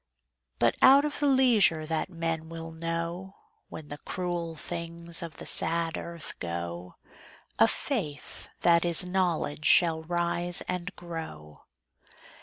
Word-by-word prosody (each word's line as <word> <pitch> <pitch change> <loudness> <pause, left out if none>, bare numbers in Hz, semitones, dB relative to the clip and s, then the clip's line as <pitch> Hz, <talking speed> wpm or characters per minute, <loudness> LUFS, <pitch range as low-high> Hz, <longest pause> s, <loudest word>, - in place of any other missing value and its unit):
But - - +3
out 275 +2 +7
of 295 - -3
the 290 - +2
leisure 235 - +4
that 160 +3 -2
men 165 -2 -3
will 165 0 -7
know, 170 +3 -4 0.3
When 155 -2 -9
the 145 - -7
cruel 175 -2 -4
things 170 +1 -4
of 165 -3 -7
the - - -8
sad 165 -1 +2
earth 170 -2 -6
go, 85 +1 -5 0.6
A 110 - +7
Faith 170 - -3
that 170 -1 +4
is 175 +1 +4
Knowledge 175 -5 -1
shall 165 -2 +5
rise 175 +1 0
and 180 0 -4
grow. 160 - -9
170 Hz, 130 wpm, -28 LUFS, 160-175 Hz, 0.6 s, out